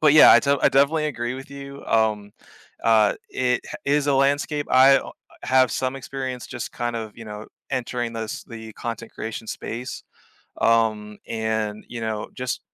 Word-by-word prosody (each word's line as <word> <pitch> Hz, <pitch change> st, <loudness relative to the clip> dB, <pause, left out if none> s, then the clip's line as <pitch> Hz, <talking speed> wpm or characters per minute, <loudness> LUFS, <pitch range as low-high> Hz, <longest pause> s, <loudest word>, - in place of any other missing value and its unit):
But 155 Hz, -2 st, +6 dB
yeah, 155 Hz, -, +9 dB
I -, -, +9 dB
de 140 Hz, 0 st, +2 dB
I -, -, +6 dB
definitely 150 Hz, +3 st, +3 dB
agree 120 Hz, -3 st, -3 dB
with 135 Hz, +1 st, -9 dB
you, 140 Hz, 0 st, -9 dB
um, 105 Hz, -2 st, +1 dB, 0.5 s
uh, 110 Hz, -2 st, +5 dB, 0.2 s
it 125 Hz, -1 st, +1 dB
h -, -, -9 dB
is 145 Hz, +1 st, +2 dB
a 140 Hz, -, +3 dB
landscape. 145 Hz, +2 st, +1 dB
I 135 Hz, +1 st, +7 dB
oh, -, -, -8 dB
uh, -, -, -9 dB, 0.3 s
have 130 Hz, -2 st, +4 dB
some 130 Hz, +1 st, -1 dB
experience, 130 Hz, -2 st, -5 dB
just 120 Hz, -3 st, -6 dB
kind 120 Hz, -1 st, -3 dB
of, 110 Hz, -2 st, -5 dB
you 115 Hz, -, -9 dB
know, 105 Hz, 0 st, -8 dB, 0.2 s
entering 120 Hz, -2 st, -2 dB
this 110 Hz, -1 st, -5 dB
the 110 Hz, -1 st, -9 dB
content 115 Hz, -1 st, -6 dB
creation 110 Hz, 0 st, -6 dB
space, 125 Hz, +3 st, -5 dB, 0.6 s
um, 110 Hz, -2 st, +2 dB
and, 110 Hz, -1 st, -2 dB
you 120 Hz, -, -6 dB
know, 110 Hz, -1 st, -3 dB
just 125 Hz, -1 st, -3 dB
120 Hz, 180 wpm, -23 LUFS, 110-135 Hz, 0.6 s, yeah